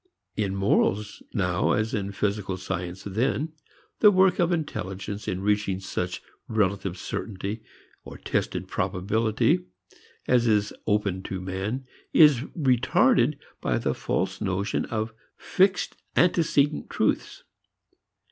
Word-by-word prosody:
In 100 Hz, -3 st, -1 dB
morals 100 Hz, +1 st, +1 dB
now, 90 Hz, -2 st, +1 dB
as 110 Hz, +2 st, 0 dB
in 100 Hz, -2 st, -2 dB
physical 100 Hz, -1 st, -2 dB
science 90 Hz, 0 st, -5 dB
then, 130 Hz, -, -1 dB, 0.5 s
the 210 Hz, -, +8 dB
work 190 Hz, -1 st, +4 dB
of 175 Hz, 0 st, +3 dB
intelligence 100 Hz, -, -3 dB
in 95 Hz, -, -2 dB
reaching 105 Hz, -2 st, +1 dB
such 90 Hz, -1 st, -4 dB, 0.2 s
relative 100 Hz, -3 st, 0 dB
certainty, 100 Hz, +1 st, -4 dB, 0.4 s
or -, -, -10 dB
tested -, -, -2 dB
probability, 110 Hz, 0 st, 0 dB, 0.6 s
as 120 Hz, -1 st, +3 dB
is 105 Hz, -2 st, +2 dB
open 105 Hz, -3 st, +1 dB
to 95 Hz, 0 st, -5 dB
man 95 Hz, +8 st, -3 dB, 0.3 s
is 150 Hz, -6 st, +7 dB, 0.2 s
retarded 130 Hz, 0 st, +3 dB, 0.2 s
by -, -, +1 dB
the -, -, 0 dB
false 95 Hz, 0 st, -2 dB
notion 95 Hz, +1 st, -1 dB
of 110 Hz, -1 st, -3 dB, 0.2 s
fixed 190 Hz, 0 st, +1 dB, 0.2 s
antecedent 155 Hz, -4 st, +2 dB
truths. -, -, -1 dB
105 Hz, 115 wpm, -26 LUFS, 95-125 Hz, 0.6 s, the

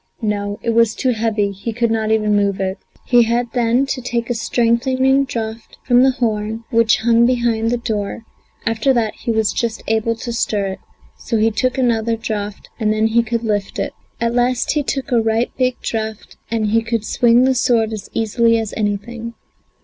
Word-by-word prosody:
No, 205 Hz, -1 st, -1 dB
it 230 Hz, -, +1 dB
was 230 Hz, -1 st, +3 dB
too 255 Hz, -, +1 dB
heavy, 215 Hz, -3 st, 0 dB
he 200 Hz, +4 st, -5 dB
could 235 Hz, 0 st, 0 dB
not 220 Hz, -1 st, 0 dB
even 215 Hz, -1 st, +2 dB
move 200 Hz, -1 st, +1 dB
it. 190 Hz, 0 st, -2 dB, 0.3 s
He 245 Hz, -1 st, +5 dB
had 235 Hz, +1 st, 0 dB
then 245 Hz, +2 st, +2 dB
to 265 Hz, -1 st, -3 dB
take 240 Hz, -1 st, -2 dB
a -, -, +2 dB
strengthening 255 Hz, +4 st, +2 dB
draught 225 Hz, -2 st, -6 dB
from 245 Hz, -1 st, +4 dB
the 265 Hz, -, +5 dB
horn, 225 Hz, -3 st, -2 dB
which 230 Hz, 0 st, +4 dB
hung 235 Hz, +1 st, +4 dB
behind 235 Hz, -3 st, +1 dB
the 245 Hz, -, +1 dB
door; 220 Hz, -2 st, -3 dB, 0.4 s
after 225 Hz, +4 st, +2 dB
that 225 Hz, -3 st, 0 dB
he -, -, -8 dB
was 220 Hz, -2 st, +1 dB
just 230 Hz, -2 st, -2 dB
able 225 Hz, +1 st, +1 dB
to 235 Hz, +1 st, -5 dB
stir 210 Hz, -3 st, 0 dB
it, 190 Hz, -, -6 dB, 0.4 s
so 230 Hz, -, -2 dB
he 220 Hz, +1 st, +3 dB
took 255 Hz, +5 st, 0 dB
another 230 Hz, -3 st, +1 dB
draught, 210 Hz, -2 st, -5 dB
and 215 Hz, -2 st, +1 dB
then 215 Hz, 0 st, +1 dB
he 235 Hz, +1 st, +3 dB
could 230 Hz, 0 st, -2 dB
lift 205 Hz, -3 st, -2 dB
it. -, -, -2 dB, 0.3 s
At 235 Hz, 0 st, 0 dB
last 245 Hz, 0 st, +1 dB
he 300 Hz, -, +1 dB
took 270 Hz, -1 st, -3 dB
a 235 Hz, -2 st, +4 dB
right, 225 Hz, +2 st, 0 dB
big 255 Hz, -1 st, 0 dB
draught, 220 Hz, -1 st, -4 dB
and 220 Hz, -2 st, 0 dB
he 225 Hz, +1 st, +3 dB
could 225 Hz, -1 st, -2 dB
swing 240 Hz, +2 st, +4 dB
the 260 Hz, 0 st, +3 dB
sword 230 Hz, -3 st, +1 dB
as 210 Hz, -2 st, -7 dB
easily 230 Hz, +1 st, +2 dB
as 225 Hz, -2 st, -3 dB
anything. 225 Hz, +3 st, -3 dB
230 Hz, 195 wpm, -19 LUFS, 220-240 Hz, 0.4 s, He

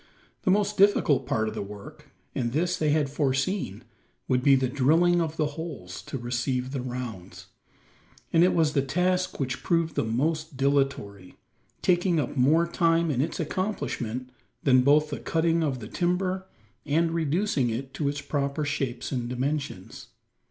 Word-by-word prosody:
The -, -, 0 dB
most 205 Hz, +2 st, +2 dB
difficult 195 Hz, -7 st, +4 dB
part 110 Hz, 0 st, 0 dB
of 110 Hz, -, -3 dB
the -, -, -4 dB
work 100 Hz, 0 st, -10 dB, 0.2 s
and 120 Hz, -2 st, -2 dB
this 175 Hz, +4 st, +1 dB
they 155 Hz, -, 0 dB
had 150 Hz, -1 st, +2 dB
foreseen 140 Hz, -, -1 dB, 0.4 s
would 125 Hz, 0 st, +2 dB
be 140 Hz, +1 st, +6 dB
the 130 Hz, -1 st, +1 dB
drilling 160 Hz, +7 st, +3 dB
of 160 Hz, -1 st, -3 dB
the 155 Hz, -, +2 dB
holes 145 Hz, -, -6 dB
to -, -, -4 dB
receive 125 Hz, +1 st, -2 dB
the 135 Hz, -2 st, -3 dB
rounds; 120 Hz, -7 st, -6 dB, 0.9 s
and 165 Hz, -, +6 dB
it 180 Hz, -, +3 dB
was 160 Hz, -3 st, +2 dB
the 140 Hz, -, +3 dB
task 180 Hz, +6 st, 0 dB
which 130 Hz, -2 st, -2 dB
proved 165 Hz, -2 st, +1 dB
the -, -, 0 dB
most 155 Hz, +6 st, -1 dB
dilatory 135 Hz, -9 st, -1 dB, 0.5 s
taking 175 Hz, -2 st, +3 dB
up 140 Hz, -, -2 dB
more 150 Hz, +6 st, +4 dB
time 170 Hz, -1 st, +2 dB
in 130 Hz, -2 st, 0 dB
its 155 Hz, -, -2 dB
accomplishment 130 Hz, -, -3 dB, 0.3 s
than 130 Hz, -2 st, +5 dB
both 150 Hz, +3 st, +4 dB
the 145 Hz, -, -3 dB
cutting 165 Hz, 0 st, +1 dB
of 140 Hz, -5 st, 0 dB
the 110 Hz, -, -7 dB
timber, 185 Hz, -, -1 dB, 0.4 s
and 165 Hz, +3 st, +1 dB
reducing 165 Hz, -, 0 dB
it 130 Hz, +4 st, -4 dB
to 145 Hz, -2 st, -1 dB
its 145 Hz, 0 st, -4 dB
proper 140 Hz, +1 st, -2 dB
shapes 135 Hz, -4 st, -3 dB
and 120 Hz, -3 st, -2 dB
dimensions. 130 Hz, -5 st, -4 dB
145 Hz, 165 wpm, -27 LUFS, 125-165 Hz, 0.9 s, be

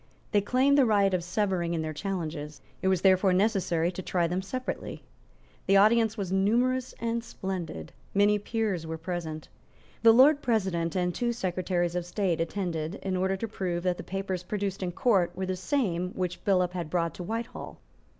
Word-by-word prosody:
They 205 Hz, -, +3 dB
claimed 260 Hz, +7 st, +3 dB
the 270 Hz, -, +6 dB
right 200 Hz, -3 st, +3 dB
of 180 Hz, -2 st, 0 dB
severing 175 Hz, -2 st, 0 dB
in 160 Hz, -, -1 dB
their 155 Hz, 0 st, -4 dB
challenges. 155 Hz, -4 st, -4 dB, 0.2 s
It -, -, 0 dB
was 190 Hz, -2 st, +2 dB
therefore 190 Hz, 0 st, +4 dB
necessary 180 Hz, -4 st, +1 dB
to 185 Hz, -, -6 dB
try 175 Hz, -1 st, 0 dB
them 180 Hz, +3 st, -1 dB
separately. 255 Hz, +7 st, -5 dB, 0.6 s
The 195 Hz, +1 st, +5 dB
audience 220 Hz, +2 st, +4 dB
was 195 Hz, -3 st, -3 dB
numerous 240 Hz, +7 st, +1 dB
and 230 Hz, 0 st, -1 dB
splendid. 180 Hz, -, -5 dB, 0.2 s
Many 205 Hz, +1 st, +4 dB
peers 205 Hz, -6 st, -2 dB
were 160 Hz, 0 st, -4 dB
present. 160 Hz, -2 st, -5 dB, 0.5 s
The 230 Hz, -, +8 dB
Lord 280 Hz, +5 st, +6 dB
President 190 Hz, -8 st, 0 dB
and 180 Hz, -1 st, 0 dB
the -, -, -7 dB
two 240 Hz, -1 st, 0 dB
Secretaries 180 Hz, -4 st, -1 dB
of 175 Hz, -1 st, -3 dB
State 175 Hz, -3 st, 0 dB
attended 165 Hz, -1 st, -2 dB
in 190 Hz, -1 st, -1 dB
order 190 Hz, +1 st, 0 dB
to 230 Hz, -, -3 dB
prove 180 Hz, -5 st, -3 dB
that 180 Hz, -1 st, 0 dB
the -, -, -7 dB
papers 195 Hz, -1 st, -3 dB
produced 195 Hz, +1 st, -3 dB
in 180 Hz, -1 st, -2 dB
Court 180 Hz, -4 st, +2 dB
were 190 Hz, +1 st, -2 dB
the 185 Hz, 0 st, -2 dB
same 185 Hz, -, -1 dB
which 180 Hz, -1 st, -3 dB
Billop 180 Hz, -3 st, +3 dB
had 175 Hz, -4 st, -4 dB
brought 170 Hz, -1 st, 0 dB
to 180 Hz, -, -7 dB
Whitehall. 225 Hz, +5 st, -5 dB
185 Hz, 185 wpm, -28 LUFS, 175-210 Hz, 0.6 s, The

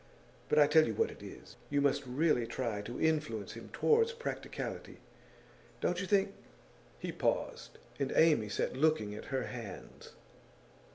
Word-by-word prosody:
But 150 Hz, -, +2 dB
I 150 Hz, -, +8 dB
tell 155 Hz, +1 st, +5 dB
you -, -, -2 dB
what 450 Hz, -, +1 dB
it -, -, -13 dB
is: -, -, -11 dB
you 145 Hz, -, +1 dB
must 140 Hz, 0 st, +2 dB
really 125 Hz, -2 st, +2 dB
try 115 Hz, -5 st, -2 dB
to 120 Hz, +4 st, -6 dB
influence 150 Hz, -10 st, 0 dB
him -, -, -10 dB
towards 460 Hz, +1 st, +3 dB
practicality. 470 Hz, 0 st, -5 dB, 0.8 s
Don't 180 Hz, +1 st, 0 dB
you 185 Hz, -, -3 dB
think 195 Hz, 0 st, +2 dB, 0.3 s
?' -, -, -27 dB
He -, -, -4 dB
paused, -, -, -2 dB, 0.2 s
and 135 Hz, -1 st, 0 dB
Amy 150 Hz, -10 st, +4 dB
sat 100 Hz, -, -1 dB
looking 135 Hz, -8 st, +2 dB
at 105 Hz, -, -8 dB
her 135 Hz, -2 st, -2 dB
hands. 115 Hz, -6 st, -8 dB
145 Hz, 160 wpm, -33 LUFS, 115-160 Hz, 0.8 s, I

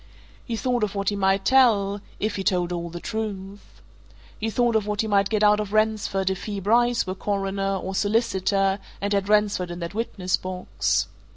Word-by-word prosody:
He 235 Hz, -, -4 dB
thought 245 Hz, 0 st, 0 dB
of 205 Hz, -1 st, -1 dB
what 200 Hz, -1 st, 0 dB
he 205 Hz, -, -2 dB
might 195 Hz, 0 st, +1 dB
tell 210 Hz, -6 st, +4 dB, 0.2 s
if 215 Hz, +1 st, -1 dB
he 195 Hz, -, -3 dB
told 180 Hz, -2 st, +1 dB
all 170 Hz, 0 st, -4 dB
the 175 Hz, +1 st, -7 dB
truth. 205 Hz, -1 st, -6 dB, 0.6 s
He 225 Hz, -, -1 dB
thought 240 Hz, +1 st, +1 dB
of 215 Hz, -2 st, +1 dB
what 210 Hz, -1 st, 0 dB
he 220 Hz, -, -2 dB
might 200 Hz, -2 st, +2 dB
get 215 Hz, -1 st, +1 dB
out 210 Hz, 0 st, +5 dB
of 210 Hz, -1 st, -4 dB
Ransford 215 Hz, -3 st, +1 dB
if 190 Hz, -, -5 dB
he, 205 Hz, -2 st, -3 dB
Bryce, 235 Hz, +4 st, +2 dB
were 185 Hz, -, -3 dB
Coroner, 195 Hz, 0 st, -2 dB
or 190 Hz, 0 st, -4 dB
solicitor, 195 Hz, -2 st, +1 dB, 0.2 s
and 200 Hz, +1 st, -1 dB
had 200 Hz, 0 st, 0 dB
Ransford 210 Hz, -4 st, +2 dB
in 175 Hz, -, -6 dB
that 170 Hz, +2 st, -5 dB
witness 200 Hz, -4 st, -1 dB
box. 185 Hz, 0 st, -1 dB
200 Hz, 195 wpm, -24 LUFS, 190-215 Hz, 0.6 s, out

